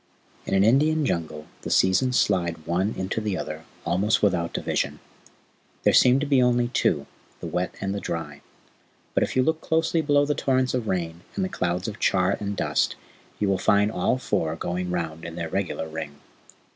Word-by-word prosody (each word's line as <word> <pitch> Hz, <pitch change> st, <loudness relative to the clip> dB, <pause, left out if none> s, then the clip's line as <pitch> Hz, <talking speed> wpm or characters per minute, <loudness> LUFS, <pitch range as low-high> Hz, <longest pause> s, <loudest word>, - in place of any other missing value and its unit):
In -, -, +1 dB
an 95 Hz, -, +4 dB
Indian 150 Hz, +7 st, +3 dB
Jungle 80 Hz, -, -2 dB, 0.2 s
the -, -, -5 dB
seasons 95 Hz, +7 st, +3 dB
slide 85 Hz, -5 st, 0 dB
one 95 Hz, +6 st, 0 dB
into 95 Hz, +4 st, -2 dB
the 105 Hz, -3 st, -2 dB
other 80 Hz, +1 st, -6 dB, 0.2 s
almost 95 Hz, +7 st, +1 dB
without 85 Hz, -4 st, +2 dB
division. -, -, -2 dB, 0.8 s
There -, -, +4 dB
seem 125 Hz, +2 st, +6 dB
to -, -, 0 dB
be 140 Hz, -3 st, +3 dB
only 120 Hz, -1 st, +2 dB
two 75 Hz, -, +1 dB, 0.3 s
the -, -, -7 dB
wet 90 Hz, 0 st, -2 dB
and 95 Hz, -1 st, -2 dB
the 100 Hz, -, -2 dB
dry; 75 Hz, -6 st, -5 dB, 0.7 s
but -, -, +2 dB
if -, -, -1 dB
you 130 Hz, -, +4 dB
look 160 Hz, +3 st, 0 dB
closely 160 Hz, 0 st, +1 dB
below 145 Hz, -1 st, +3 dB
the 150 Hz, -, +1 dB
torrents 130 Hz, -3 st, +1 dB
of 125 Hz, -4 st, -1 dB
rain 85 Hz, -3 st, -2 dB
and 190 Hz, -, 0 dB
the -, -, -4 dB
clouds 90 Hz, -, -2 dB
of 110 Hz, -1 st, -6 dB
char 95 Hz, +1 st, +2 dB
and 100 Hz, -1 st, -4 dB
dust -, -, +1 dB, 0.4 s
you 105 Hz, -, 0 dB
will 95 Hz, -1 st, +1 dB
find 105 Hz, +1 st, +3 dB
all 110 Hz, +5 st, +1 dB
four 80 Hz, -10 st, -1 dB
going 90 Hz, +2 st, -3 dB
round 80 Hz, -2 st, -3 dB
in 85 Hz, -1 st, -7 dB
their 85 Hz, -1 st, -4 dB
regular 95 Hz, -3 st, -2 dB
ring. 80 Hz, -2 st, -6 dB
95 Hz, 190 wpm, -25 LUFS, 85-125 Hz, 0.8 s, seem